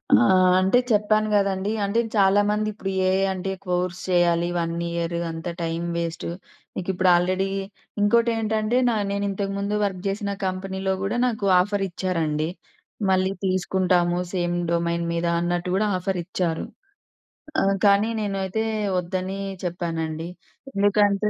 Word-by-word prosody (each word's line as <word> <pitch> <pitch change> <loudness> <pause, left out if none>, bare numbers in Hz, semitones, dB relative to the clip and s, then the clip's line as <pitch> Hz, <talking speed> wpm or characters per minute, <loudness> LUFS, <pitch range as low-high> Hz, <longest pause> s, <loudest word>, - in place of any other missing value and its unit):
ఆ! - - +4 0.4
అంటే 190 +6 +4
చెప్పాను 215 0 +3
గదండీ. 195 0 +1
అంటే 200 +4 +1 0.2
చాలామంది 205 +2 +3
ఇప్పుడు 195 -2 -5 0.2
ఏఐ 190 +1 +2
అంటే, 190 0 -3 0.2
కోర్స్ 180 0 -1
చేయాలి 175 -1 +3
1 165 0 -1 0.2
ఇయర్ 170 0 -2 0.2
అంత 165 +1 -7 0.2
టైం 165 0 -2 0.2
వేస్టు. 165 0 -3 0.5
మీకిప్పుడు 185 0 0
ఆల్రెడీ 185 +2 +1 0.5
ఇంకోటేంటంటే 220 +1 +2
నా 225 - 0
నేనింతకముందు 200 0 -2
వర్క్ 190 -3 -3
చేసిన 200 +1 -2 0.2
కంపెనీలో 190 +1 -2
కూడా 200 +4 -1
నాకు 220 -5 -1
ఆఫరిచ్చారండి. 180 -5 -1 0.6
మళ్ళీ 190 0 +2
తీసుకుంటాము 180 -2 +1 0.2
సేమ్ 175 -1 0 0.2
డొమైన్ 170 0 0
మీద 170 0 -1
అన్నట్టు 175 +1 -1
కూడా 210 +2 +2
ఆఫరిచ్చారు. 180 -2 -2 1.0
ఆహ్, 195 0 +2
కానీ 200 +2 +5
నేనైతే 195 +1 -1 0.4
వద్దని 185 +2 -3 0.3
చెప్పానండి. 165 -2 -3 0.5
ఎందుకంటే 205 0 +3
190 Hz, 115 wpm, -24 LUFS, 175-200 Hz, 1.0 s, కానీ